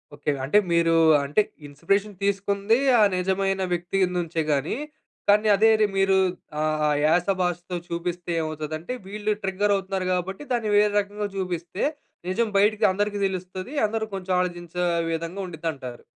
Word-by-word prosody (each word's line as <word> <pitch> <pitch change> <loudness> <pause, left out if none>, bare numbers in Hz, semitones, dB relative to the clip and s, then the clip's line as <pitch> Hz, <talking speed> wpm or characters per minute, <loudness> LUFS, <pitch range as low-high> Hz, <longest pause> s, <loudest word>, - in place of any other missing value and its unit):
Okay. 145 +1 -1
అంటే 175 +9 +3
మీరూ 165 -1 +3 0.3
అంటే, 145 +9 +3 0.3
ఇన్స్‌పీరేషన్ 200 +8 -1
తీసుకుంది 200 +2 +1 0.2
ఆ - - +6 0.2
నిజమైన 195 +1 0
వ్యక్తి 175 +3 -2 0.2
నుంచే 165 -1 -1
గాని, 145 - 0 0.5
కానీ 210 +1 +5
అదే 220 +3 +5
రి 215 - +5
మీరు 195 0 +4 0.4
ఆ - - +1 0.2
ఆ - - +2 0.2
యాస, 175 +4 +3
భాషతో 180 0 -2
చూపిస్తే 170 +1 -4
ఏమవుతదంటే 155 +4 -4
వీళ్ళు 210 +1 -1
ట్రిగ్గరవుతున్నారు 195 -1 0
గాబట్టి, 185 +5 -2
దాన్ని 230 -3 0
వేరే 210 0 +4
రకంగా 205 +1 -3
జూపిస్తే, 180 -1 -3 0.5
నిజం 220 +4 0
బైటికి 210 +2 +3
అందరికీ 205 +1 -1
తెలుస్తది, 185 +6 -6
అందరూ 220 +1 -2
కొంచెం 190 -1 -3
ఆలోచించే 175 -1 -3 0.3
విధంగా 165 +4 -3
ఉండిద్దంటారు. 150 -7 -6
190 Hz, 135 wpm, -24 LUFS, 170-205 Hz, 0.5 s, ఆ